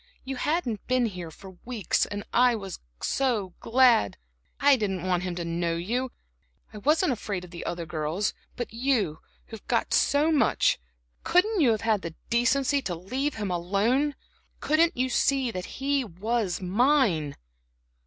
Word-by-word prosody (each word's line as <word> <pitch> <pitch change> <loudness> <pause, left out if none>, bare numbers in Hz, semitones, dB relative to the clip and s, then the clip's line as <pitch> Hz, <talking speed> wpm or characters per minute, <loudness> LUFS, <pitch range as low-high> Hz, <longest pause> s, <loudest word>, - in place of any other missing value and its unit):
You 270 0 -4
hadn't 255 - -1
been 255 -1 +2
here 180 -6 -5
for 185 +2 -13
weeks, 235 -7 0
and 205 0 -5
I 245 -1 +5
was 195 -4 -6 0.8
glad. 240 - +4 0.4
I 285 0 +6
didn't 195 -7 -2
want 180 -1 +1
him 180 -1 -3
to 170 -1 -4
know 170 0 -1
you 240 +9 -2 0.6
I 210 - -7
wasn't 305 - +2
afraid 205 -6 -3
of 175 - -15
the 170 - -7
other 170 -1 -3
girls. 160 +5 -2 0.2
But 240 -3 -5
you 230 - 0 0.3
who've 225 -2 -11
got - - 0
so 295 +3 +3
much 280 -7 +3 0.4
couldn't 385 +2 +3
you 265 - +5
have 220 -2 +1
had 220 -3 +1
the 165 -2 -6 0.2
decency 265 +4 +2
to 185 -8 -3
leave 255 - -3
him 205 -4 -3
alone? 210 +12 +1 0.4
Couldn't 325 +1 +2
you 255 +1 +1
see 265 0 +1
that 185 -3 -5
he 275 0 +1
was 210 0 -2
mine?" 195 - +2
225 Hz, 155 wpm, -27 LUFS, 180-265 Hz, 0.8 s, I